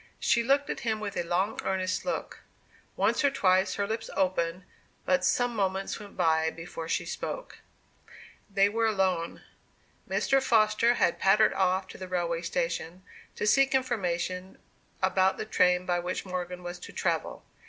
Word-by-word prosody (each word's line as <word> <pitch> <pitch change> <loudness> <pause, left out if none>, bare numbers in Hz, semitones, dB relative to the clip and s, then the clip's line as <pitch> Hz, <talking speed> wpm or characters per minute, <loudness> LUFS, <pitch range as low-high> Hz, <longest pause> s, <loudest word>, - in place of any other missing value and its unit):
She 235 - +3
looked 275 +4 +2
at - - -4
him 220 -2 -1
with 205 -2 -5
a 175 - 0
long 180 +5 -1
earnest 185 -1 -1
look; 270 - -3 0.6
once - - +1
or 280 - +5
twice 190 -7 +2
her 200 - 0
lips 225 +2 -4
opened, 180 -1 0 0.4
but 185 0 +2
some 245 +5 +1
moments 195 -1 -1
went 205 -1 -12
by 160 -2 +3
before 165 0 -7
she - - 0
spoke. - - -6 0.9
They 195 0 +4
were 225 +2 +1
alone. 190 -5 0 0.7
Mr. 270 0 +2
Foster 230 -1 +3
had 170 - +1
pattered 210 +3 +4
off 190 0 +1
to - - -11
the 185 - -6
railway 170 -2 -1
station, 170 +1 -3 0.3
to - - -2
seek 275 +6 +4
for - - +6
information 185 -6 -3 0.5
about 190 0 +3
the - - -4
train 180 -3 +2
by 175 -1 +1
which 180 +2 -3
Morgan 180 -1 -5
was 175 0 -6
to - - -10
travel. - - -2
190 Hz, 165 wpm, -28 LUFS, 180-215 Hz, 0.9 s, for